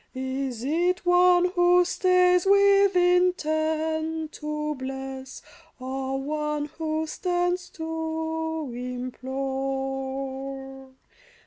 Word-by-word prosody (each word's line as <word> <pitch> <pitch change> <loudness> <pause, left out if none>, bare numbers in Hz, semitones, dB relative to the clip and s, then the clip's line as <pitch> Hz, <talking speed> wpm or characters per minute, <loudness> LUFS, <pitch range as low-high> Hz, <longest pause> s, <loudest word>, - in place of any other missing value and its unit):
Is 260 -2 -3
it 350 +6 0
one 355 0 +5
who 355 0 +4
stays 360 0 +3
with 400 0 +5
intent 320 -3 +1
to 300 0 -3
bless, 265 0 -7 0.4
Or 265 +1 -3
one 300 +1 -2
who 315 0 -1
stands 355 +2 -1
to 320 -2 -3
implore 270 +1 -4
310 Hz, 80 wpm, -26 LUFS, 270-355 Hz, 0.4 s, one